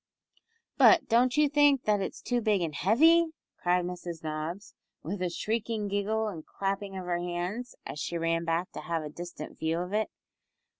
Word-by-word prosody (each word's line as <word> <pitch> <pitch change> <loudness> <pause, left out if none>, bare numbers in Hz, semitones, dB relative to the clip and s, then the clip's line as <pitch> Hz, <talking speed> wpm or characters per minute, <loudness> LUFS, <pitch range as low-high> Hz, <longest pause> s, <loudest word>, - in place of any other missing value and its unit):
"But 345 - +7
don't 245 +4 +3
you 300 0 +5
think 285 -2 +4
that 210 -2 +2
it's 190 - -5
too 245 -1 0
big 210 -4 +2
and 165 -3 -2
heavy?" 320 - +5 0.3
cried 180 0 +2
Mrs 175 -2 -6
Nobbs, 160 +6 -4 0.3
with 185 +5 -4
a 180 - +1
shrieking 215 +3 -2
giggle 210 +2 0
and 170 -7 -6
clapping 195 +1 -3
of 185 - -5
her 175 -1 0
hands, 180 +8 -4
as 150 - -6
she 170 +2 -2
ran 165 0 0
back 165 +2 -1
to - - -7
have 165 -2 -2
a 150 - -5
distant 170 -1 -8
view 160 +1 0
of 180 +3 -4
it. 215 +1 +1
190 Hz, 185 wpm, -29 LUFS, 170-220 Hz, 0.3 s, But